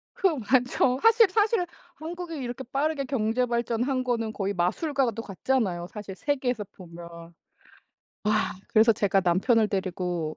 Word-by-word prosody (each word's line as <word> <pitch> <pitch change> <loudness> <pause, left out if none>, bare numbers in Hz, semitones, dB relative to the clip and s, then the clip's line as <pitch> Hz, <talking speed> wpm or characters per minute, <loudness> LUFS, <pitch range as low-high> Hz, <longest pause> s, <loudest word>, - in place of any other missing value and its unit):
그 - - +1 0.2
맞죠. 255 0 +3
사실 455 -1 +6
사실 425 -1 +2 0.3
한국이 335 +1 -6
이렇게 255 -1 -5
빠르게 285 +1 0
경제 250 -1 0
발전한 240 +2 -1
거는 230 -3 -1
거의 200 -2 -2
마술과도 230 - 0
같잖아요 195 -4 -1
사실 205 -3 -7
세계에서 250 -2 -1
보면. 170 -1 -11 0.9
아. 215 0 +1 0.2
그래서 225 +1 +5
제가 200 -2 +2
남편을 210 +6 +3
데리고 180 -5 -2
230 Hz, 305 characters per minute, -26 LUFS, 195-270 Hz, 0.9 s, 사실